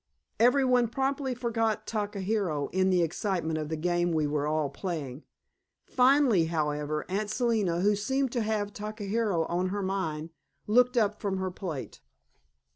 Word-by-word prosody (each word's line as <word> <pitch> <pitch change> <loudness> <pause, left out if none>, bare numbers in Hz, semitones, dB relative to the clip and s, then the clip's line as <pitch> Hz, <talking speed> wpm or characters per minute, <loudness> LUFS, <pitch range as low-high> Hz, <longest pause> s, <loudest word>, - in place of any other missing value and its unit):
Every 250 +4 +5
one 250 -2 +3
promptly 270 +2 -1
forgot 225 -3 -1
Takahiro 200 -7 -2
in 190 +1 +2
the 180 -2 +3
excitement 165 -2 -1
of 155 -1 -4
the 160 - -1
game 175 +1 +1
we 155 -2 +1
were 145 0 -1
all 155 -1 +1
playing. 145 -2 -5 0.6
Finally, 255 - +4
however, 150 -2 -1
Aunt 205 +3 -2
Selina, 215 -7 +1
who 205 +2 +3
seemed 265 +5 0
to 240 - -1
have 210 -2 -1
Takahiro 210 -4 -1
on 175 +3 -1
her 200 +2 -2
mind, 165 -5 -2 0.3
looked 250 +3 +3
up 210 -2 +1
from 195 -2 -1
her 190 0 -2
plate. 170 -7 -6
195 Hz, 150 wpm, -28 LUFS, 165-225 Hz, 0.6 s, Every